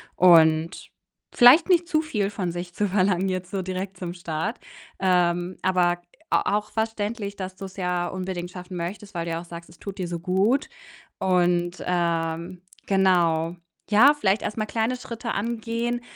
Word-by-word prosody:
und 165 Hz, -1 st, +4 dB, 0.5 s
vielleicht 255 Hz, +10 st, +7 dB
nicht 345 Hz, -1 st, +4 dB
zu 310 Hz, -3 st, +2 dB
viel 210 Hz, -10 st, -2 dB
von 185 Hz, -6 st, -3 dB
sich 175 Hz, +1 st, -6 dB
zu 205 Hz, +2 st, 0 dB
verlangen 190 Hz, -1 st, +2 dB
jetzt 185 Hz, 0 st, -4 dB
so 195 Hz, -1 st, -2 dB
direkt 185 Hz, +1 st, -5 dB
zum 175 Hz, -1 st, -5 dB
Start. 170 Hz, +6 st, -4 dB, 0.4 s
Ähm, 180 Hz, -1 st, +1 dB
aber 175 Hz, -2 st, +2 dB, 0.3 s
a 205 Hz, -, +2 dB
auch 210 Hz, -, -6 dB
verständlich, 220 Hz, -2 st, -3 dB
dass 185 Hz, -1 st, -6 dB
du's 195 Hz, 0 st, -9 dB
ja 180 Hz, -1 st, -1 dB
unbedingt 185 Hz, -2 st, -4 dB
schaffen 180 Hz, 0 st, -8 dB
möchtest, 195 Hz, +4 st, -6 dB
weil 170 Hz, 0 st, -2 dB
du 170 Hz, -, -3 dB
ja 165 Hz, +1 st, -2 dB
auch -, -, -12 dB
sagst, 170 Hz, 0 st, -10 dB
es 170 Hz, -, -17 dB
tut 195 Hz, -1 st, -8 dB
dir 180 Hz, -, -2 dB
so 170 Hz, -1 st, -4 dB
gut 195 Hz, -, +1 dB, 0.5 s
und, 175 Hz, -1 st, +1 dB
ähm, 170 Hz, 0 st, -1 dB, 0.2 s
genau. 175 Hz, -4 st, +2 dB, 0.4 s
Ja, 260 Hz, +8 st, +7 dB
vielleicht 205 Hz, -7 st, +1 dB
erst 210 Hz, -, -4 dB
mal 215 Hz, -, 0 dB
kleine 225 Hz, +3 st, -1 dB
Schritte 235 Hz, -1 st, -5 dB
angehen 235 Hz, +2 st, -2 dB
185 Hz, 165 wpm, -24 LUFS, 175-210 Hz, 0.5 s, vielleicht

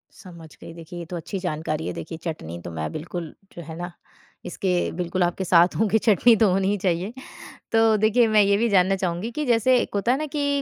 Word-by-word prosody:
समझ 170 Hz, -5 st, -13 dB
गई, -, -, -10 dB
देखिए 165 Hz, +1 st, -10 dB
ये 170 Hz, -, -6 dB
तो 180 Hz, -, -4 dB
अच्छी 185 Hz, +4 st, -5 dB
जानकारी 155 Hz, -3 st, -3 dB
है। -, -, -3 dB
देखिए, 165 Hz, 0 st, -7 dB
चटनी 85 Hz, -, -5 dB
तो 85 Hz, -, -7 dB
मैं 80 Hz, -1 st, -4 dB
बिल्कुल 165 Hz, +1 st, -6 dB, 0.2 s
जो 170 Hz, -, -9 dB
है 160 Hz, 0 st, -9 dB
ना, 175 Hz, +1 st, -5 dB, 0.5 s
इसके 180 Hz, +1 st, -2 dB, 0.2 s
बिल्कुल 180 Hz, +1 st, -2 dB
आपके 175 Hz, +2 st, 0 dB
साथ 175 Hz, 0 st, +4 dB
हूँ 220 Hz, -, +2 dB
कि 220 Hz, -, +3 dB
चटनी 225 Hz, +2 st, +4 dB
तो 215 Hz, -2 st, +3 dB
होनी 190 Hz, +1 st, +1 dB
ही 205 Hz, -, +1 dB
चाहिए। 180 Hz, +4 st, 0 dB, 0.6 s
तो 225 Hz, -1 st, +4 dB
देखिए, 230 Hz, +2 st, +4 dB
मैं 215 Hz, -1 st, +4 dB
ये 200 Hz, 0 st, +3 dB
भी 230 Hz, +2 st, +1 dB
जानना 195 Hz, -1 st, +3 dB
चाहूँगी 185 Hz, +4 st, -3 dB
कि 300 Hz, -, -1 dB
जैसे 245 Hz, +1 st, +3 dB
एक -, -, -4 dB
होता 200 Hz, +4 st, +1 dB
है 260 Hz, -, +2 dB
ना 310 Hz, -, -3 dB
कि 285 Hz, -1 st, 0 dB
185 Hz, 230 wpm, -23 LUFS, 170-220 Hz, 0.6 s, साथ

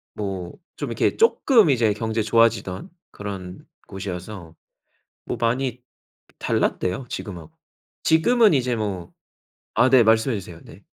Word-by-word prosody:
뭐 95 Hz, -4 st, -5 dB, 0.2 s
좀 -, -, -4 dB
이렇게 -, -, 0 dB
쪼끔 265 Hz, -, +4 dB
이제 115 Hz, -6 st, +3 dB
경제 110 Hz, +1 st, -2 dB
좋아지던 115 Hz, -, +1 dB, 0.2 s
그런 95 Hz, -3 st, -8 dB, 0.2 s
곳이어서. 95 Hz, -2 st, -7 dB, 0.7 s
뭐 -, -, -2 dB
많이 125 Hz, +1 st, -1 dB, 0.6 s
달랐대요, 90 Hz, +8 st, -1 dB
지금하고. 85 Hz, -10 st, -7 dB, 0.5 s
지금은 215 Hz, +5 st, +4 dB
이제 125 Hz, -3 st, +1 dB
뭐 100 Hz, -6 st, -4 dB, 0.6 s
아 130 Hz, -, +4 dB
네. 130 Hz, -2 st, +7 dB
말씀해 110 Hz, +2 st, +3 dB
주세요. 85 Hz, -3 st, -12 dB
네. -, -, -15 dB
110 Hz, 255 characters per minute, -23 LUFS, 95-125 Hz, 0.7 s, 네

